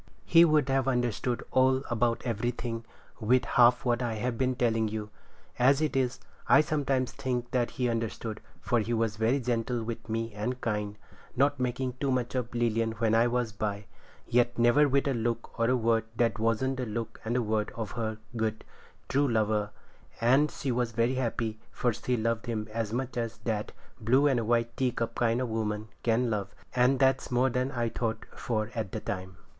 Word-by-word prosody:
He 165 0 +7
would 155 -4 +4
have 135 -1 +1
understood 120 -1 0
all 130 +1 +3
about 120 0 +1
everything 115 0 -2 0.3
with 125 +3 +3
half 120 +1 +4
what 120 0 +1
I 120 -2 -1
have 120 +3 -2
been 130 +1 0
telling 115 -3 +1
you. 105 0 -5 0.5
As 135 +3 +5
it 155 -2 0
is, 130 -1 0 0.3
I - - +8
sometimes 140 -5 0
think 125 -2 -3
that 120 -2 +1
he 125 -1 -1
understood, 115 -1 -3 0.2
for 120 - +1
he 115 +2 -1
was 110 -1 0
very 115 +5 +2
gentle 120 -1 -1
with 115 0 -6
me 115 0 -2
and 125 +5 -3
kind, 105 -3 -2 0.4
not 140 +2 +2
making 125 0 -2
too 140 - 0
much 125 -2 0
of 125 -2 -3
Lilian 115 -1 +1
when 110 0 0
I 115 +1 +5
was 120 -2 0
by, 105 0 -3 0.4
yet 120 0 +2
never 120 +5 +5
with 140 +1 +2
a 140 - +2
look 115 0 -3
or 115 +1 +3
a 130 - +3
word 115 -1 +2
that 115 -1 +1
wasn't 115 +4 +1
the 125 -2 -3
look 115 +1 -5
and 115 +2 -2
the 125 - +2
word 105 -1 -1
of 110 -2 -4
her 110 -2 -3 0.2
good, 110 -1 -2 0.4
true 140 +1 +2
lover; 110 -3 +1 0.5
and 130 +6 +4
she 135 - -3
was 120 -1 -1
very 115 +3 +2
happy, 115 -3 -2
for 120 -2 0
she 125 +3 -1
loved 115 +1 -1
him 110 -2 -2
as 115 -2 -2
much 125 +2 -3
as 115 -1 -2
that 110 -3 -2 0.3
blue 125 +6 +3
and 120 -6 +2
white 120 0 +1
teacup 120 -3 -1
kind 115 0 +1
of 130 -2 -2
woman 110 -1 -2
can 115 +1 +1
love; 100 -2 -3 0.2
and 125 +2 +4
that's 135 0 +2
more 125 +1 +2
than 125 +2 -1
I 120 -2 -1
thought 115 -1 -3
for 110 -1 -2
at 110 -5 -4
the - - -2
time. 95 -1 -5
120 Hz, 195 wpm, -29 LUFS, 110-125 Hz, 0.5 s, I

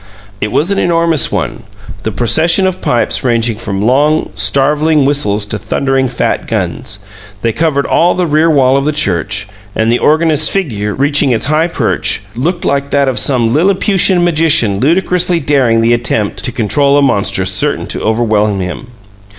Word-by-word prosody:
It 105 - -2
was 165 - 0
an 200 - 0
enormous 165 -3 +1
one, - - -3 0.4
the - - -3
procession 165 - +1
of 185 -1 -2
pipes 120 - 0
ranging 115 -3 0
from 100 -3 -3
long, 145 +6 +1
starveling 150 +2 +1
whistles 105 -8 0
to 105 +1 -5
thundering 135 +4 -1
fat - - -2
guns; - - -4 0.5
they 115 -1 0
covered 150 -2 0
all 175 +1 +2
the 180 0 0
rear 155 +1 +2
wall 135 -3 +3
of 140 - -1
the 150 - 0
church, 100 - -1 0.3
and 110 +1 +1
the 120 - +1
organist's 155 -1 +2
figure, 110 - -2
reaching 145 0 +1
its 120 -1 0
high 155 +4 +1
perch, 125 -8 -1
looked 170 +8 -2
like 140 0 -1
that 140 -1 +1
of 130 - 0
some 120 -4 +1
Lilliputian 185 +2 +2
magician 155 - +2
ludicrously 175 - +1
daring 130 -6 +1
the 115 +1 +2
attempt 115 -3 -1
to 125 - -3
control 140 +5 +1
a 145 - +3
monster 115 -7 0
certain - - -1
to - - -5
overwhelm 110 -3 0
him. 90 +7 -5
140 Hz, 165 wpm, -12 LUFS, 115-160 Hz, 0.5 s, wall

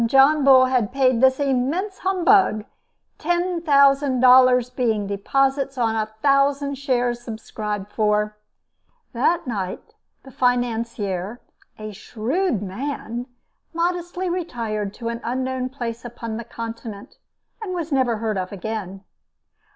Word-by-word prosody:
John 275 +4 +5
Bull 260 -1 +7
had 250 -5 0
paid 255 -3 +2
this 260 +1 +4
immense 285 +9 -1
humbug 375 - +3 0.5
$10,000, 275 -7 +4
being 220 -5 0
deposits 270 +7 0
on 225 -2 +1
a 215 -1 0 0.2
thousand 280 0 +2
shares 245 -3 0
subscribed 210 -3 -5
for. 210 -1 +1 0.8
That 330 +8 +1
night, 195 -7 -5 0.3
the 265 - -13
financier 230 -5 -1 0.4
a 215 0 -7
shrewd 240 - -2
man! 240 +3 -5 0.5
modestly 350 +1 -1
retired 230 - -3
to 230 -1 -4
an 235 0 -5
unknown 255 +1 -2
place 240 -3 -5
upon 230 -2 -6
the 235 - -6
Continent, 230 -3 -8 0.4
and 375 -4 -4
was 330 -2 -4
never 255 -4 +2
heard 215 -2 -2
of 185 0 -4
again. 200 -1 -5
250 Hz, 115 wpm, -22 LUFS, 220-280 Hz, 0.8 s, Bull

